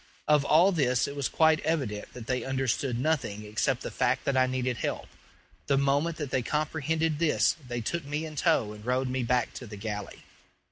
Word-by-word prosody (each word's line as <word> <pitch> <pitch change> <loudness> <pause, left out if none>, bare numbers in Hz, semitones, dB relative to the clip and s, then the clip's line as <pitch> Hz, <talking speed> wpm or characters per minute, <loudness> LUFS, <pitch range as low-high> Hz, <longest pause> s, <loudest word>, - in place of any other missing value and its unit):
Of 150 -2 +4
all 165 +7 +5
this 125 -8 +2
it 140 - -6
was 140 -2 -1
quite 160 -1 +4
evident 130 -11 -2
that 120 -3 -8
they 125 +1 -1
understood 135 -1 -1
nothing 120 -7 -1
except 105 +1 -1
the - - -5
fact - - 0
that 140 - +1
I 130 0 +4
needed 130 -1 -1
help. - - -3 0.6
The 140 - +3
moment 140 +4 +1
that 145 -5 -4
they 130 - +1
comprehended 155 +2 -1
this 165 -2 +3
they 120 -1 -3
took 170 +9 -2
me 150 +3 -3
in 155 -1 -8
tow 105 -6 +2
and 105 0 -12
rowed 125 +2 0
back 125 0 +1
to 125 - -8
the 105 -1 -8
galley. 105 -1 -6
135 Hz, 195 wpm, -28 LUFS, 120-155 Hz, 0.6 s, all